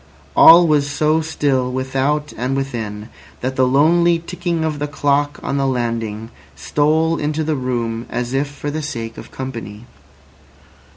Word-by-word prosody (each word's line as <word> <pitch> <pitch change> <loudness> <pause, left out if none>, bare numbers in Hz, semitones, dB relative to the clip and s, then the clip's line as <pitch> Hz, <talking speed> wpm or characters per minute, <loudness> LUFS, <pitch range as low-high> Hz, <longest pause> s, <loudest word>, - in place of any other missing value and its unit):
All 170 +2 +9
was 150 -3 +2
so 155 +2 +1
still 140 -5 0
without 135 +3 -1
and 125 +4 -2
within 110 -6 -4 0.3
that 130 +1 -2
the 130 -1 +3
lonely 170 +6 +4
ticking 170 -1 -3
of 155 -2 -2
the 145 - -2
clock 145 0 0
on 140 - -2
the 135 -1 +1
landing 115 -3 -3 0.2
stole 160 +2 +1
into 150 +1 -1
the 155 0 -1
room 120 -3 -3
as 125 +1 -3
if 140 +2 0
for 145 +1 -6
the 155 +1 -3
sake 115 -6 -5
of - - -11
company. 115 -5 -7
140 Hz, 155 wpm, -19 LUFS, 125-155 Hz, 0.3 s, All